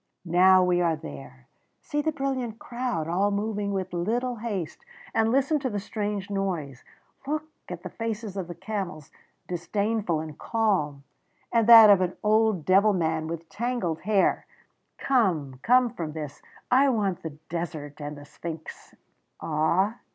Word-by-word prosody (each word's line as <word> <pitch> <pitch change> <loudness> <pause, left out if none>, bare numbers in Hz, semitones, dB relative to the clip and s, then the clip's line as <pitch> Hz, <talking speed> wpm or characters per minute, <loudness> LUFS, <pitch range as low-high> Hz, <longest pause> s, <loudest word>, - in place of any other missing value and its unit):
Now 185 +2 +6
we 180 -1 +2
are 165 -2 +2
there. 70 - -10 0.4
See 295 - -1
the 315 +1 0
brilliant 265 -6 -3
crowd 235 -11 -3
all 190 +5 +1
moving 205 0 -2
with 190 -2 -3
little 235 +8 -1
haste, 205 -7 -4 0.3
and 225 0 +2
listen 275 +4 +2
to 265 -2 -2
the 205 -3 -2
strange 205 -1 -3
noise. 170 -10 -3 0.4
Look 305 +1 -1 0.3
at - - -7
the - - -7
faces 225 -3 -4
of 190 -3 -4
the 175 - -7
camels, 185 -5 -5 0.4
disdainful 200 0 -1
and 155 -1 -7
calm, 185 -11 0 0.5
and 230 -2 +2
that 225 -3 +11
of 195 -2 +5
an 180 0 -1
old 215 -5 +2
devil 200 +3 +5
man 160 -3 0
with 165 0 -6
tangled 225 -8 -2
hair.... 205 -1 +1 0.5
"Come 170 - +1
come 250 - +4
from 160 -5 -5
this; 150 -3 -7 0.3
I 270 +3 +5
want 205 -7 0
the 155 -3 -7
desert 155 -3 -5
and 145 0 -5
the 145 - -11
Sphinx! 160 +2 -9 0.4
"Ah! 170 +8 +1
195 Hz, 150 wpm, -26 LUFS, 160-225 Hz, 0.5 s, that